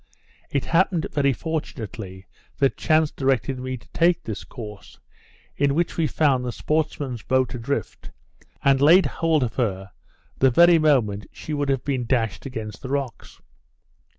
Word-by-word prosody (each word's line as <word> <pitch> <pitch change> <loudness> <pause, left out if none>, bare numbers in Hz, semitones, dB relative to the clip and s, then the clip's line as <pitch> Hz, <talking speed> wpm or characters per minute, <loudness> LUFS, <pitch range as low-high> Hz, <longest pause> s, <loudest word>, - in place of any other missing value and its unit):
It 140 - -1
happened 170 0 +2
very 140 -2 +2
fortunately 110 - -5 0.3
that 135 -1 +2
chance 155 -2 +2
directed 135 -1 0
me 130 0 -4
to 115 - -19
take 170 0 +2
this 110 -3 -5
course, 105 -5 -10 0.6
in 140 -1 +2
which 170 +1 0
we 165 -2 +1
found 135 -2 +2
the 125 - -2
sportsmen's 145 -4 -2
boat 130 0 +1
adrift, 125 -2 -4 0.5
and 135 -1 +4
laid 170 +6 +7
hold 160 -4 +1
of 120 - -2
her 95 -6 -2 0.5
the 135 - +5
very 170 +6 +6
moment 120 -10 +2
she 155 - -7
would 145 -1 -1
have 135 -2 0
been 130 -4 -2
dashed 115 -1 -1
against 110 -5 -7
the 130 - -7
rocks. 140 -3 -4
135 Hz, 150 wpm, -23 LUFS, 120-155 Hz, 0.6 s, laid